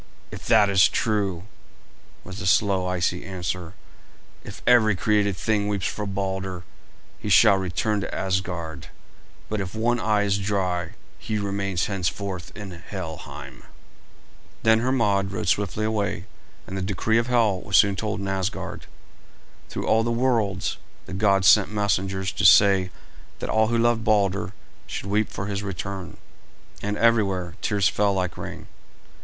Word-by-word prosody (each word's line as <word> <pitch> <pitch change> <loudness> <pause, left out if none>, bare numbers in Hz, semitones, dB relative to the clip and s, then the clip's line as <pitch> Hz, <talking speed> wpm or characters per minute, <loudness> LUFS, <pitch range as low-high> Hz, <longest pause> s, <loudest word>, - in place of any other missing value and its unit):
"If - - -9
that 110 -3 +5
is 95 -2 +5
true," 100 -6 -1 0.8
was 95 +3 -8
the 105 - -3
slow, 95 0 +2
icy 90 -1 -1
answer, 90 -1 -5 0.7
"if - - -10
every 115 -4 +5
created 100 -1 +1
thing 105 0 0
weeps 100 -2 -2
for 105 -1 -3
Balder, 95 -2 -3 0.6
he 105 - -5
shall 100 +1 +6
return 95 +3 -1
to - - -5
Asgard; 90 -5 -3 0.6
but 110 -1 -2
if 95 +2 -6
one 120 +2 +1
eye 105 -2 +1
is 100 0 +1
dry 95 -4 -1 0.3
he 110 - -3
remains 100 -3 -1
henceforth 95 -1 -3
in 100 -3 -7
Helheim." 80 -7 -8 1.0
Then 110 0 +5
Hermod 105 -6 +1
rode 100 - -4
swiftly 105 +1 0
away, 100 -5 -2 0.4
and 95 - -7
the 95 - -2
decree 100 +4 +1
of 115 - -2
Hel 115 -6 +2
was 100 -4 +2
soon 100 -2 +5
told 105 +2 -3
in 100 - -4
Asgard. 95 +1 -3 0.8
Through - - -4
all 110 - +3
the 120 - -1
worlds 115 -6 0 0.3
the - - -8
gods 100 -1 +3
sent 105 -2 +6
messengers 95 -2 -1
to - - -4
say 95 -2 +6 0.5
that - - -4
all 110 0 +3
who 120 +1 0
loved 115 -1 +2
Balder 100 -4 +1 0.4
should - - -5
weep 105 +2 0
for 95 - -5
his 100 0 -3
return, 95 -1 -6 0.6
and 105 0 -2
everywhere 100 -7 +2
tears 100 -3 +2
fell 100 0 +1
like 90 -2 -2
rain. - - -7
100 Hz, 150 wpm, -24 LUFS, 95-105 Hz, 1.0 s, shall